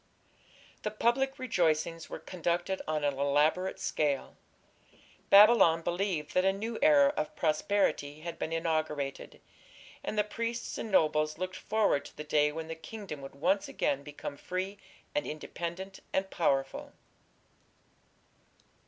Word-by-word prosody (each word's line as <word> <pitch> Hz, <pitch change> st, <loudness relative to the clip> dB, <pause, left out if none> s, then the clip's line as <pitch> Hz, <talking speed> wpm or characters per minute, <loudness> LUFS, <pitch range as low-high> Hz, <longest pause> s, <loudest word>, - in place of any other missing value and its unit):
The 210 Hz, -, -1 dB
public 240 Hz, +5 st, +1 dB
rejoicings 165 Hz, -8 st, 0 dB
were -, -, -5 dB
conducted 175 Hz, +1 st, -2 dB
on 155 Hz, -1 st, -1 dB
an 145 Hz, -1 st, +2 dB
elaborate 150 Hz, +7 st, +2 dB
scale. 145 Hz, -3 st, -1 dB, 0.9 s
Babylon 200 Hz, -5 st, +7 dB
believed 175 Hz, -4 st, -1 dB
that 185 Hz, -, +3 dB
a 190 Hz, -, +4 dB
new 220 Hz, +4 st, -4 dB
era 285 Hz, -1 st, +6 dB
of 155 Hz, -, -3 dB
prosperity 155 Hz, -3 st, 0 dB
had 170 Hz, +1 st, -6 dB
been 160 Hz, -, -3 dB
inaugurated, 155 Hz, -4 st, -2 dB, 0.6 s
and 215 Hz, -, -4 dB
the 210 Hz, -, +4 dB
priests 230 Hz, +3 st, -4 dB
and 225 Hz, -, -4 dB
nobles 155 Hz, -4 st, +2 dB
looked 185 Hz, +1 st, -4 dB
forward 210 Hz, -9 st, +1 dB
to -, -, -13 dB
the 150 Hz, -, -5 dB
day 150 Hz, 0 st, +2 dB
when 160 Hz, +1 st, -5 dB
the 165 Hz, -, -4 dB
kingdom 160 Hz, -1 st, -8 dB
would 135 Hz, 0 st, -9 dB
once 190 Hz, +7 st, +1 dB
again 140 Hz, 0 st, -1 dB
become 145 Hz, 0 st, -7 dB
free 190 Hz, +4 st, -4 dB, 0.3 s
and 295 Hz, 0 st, -1 dB
independent 170 Hz, +5 st, -6 dB
and 190 Hz, 0 st, -1 dB
powerful. 135 Hz, -5 st, 0 dB
170 Hz, 135 wpm, -31 LUFS, 150-200 Hz, 0.9 s, Babylon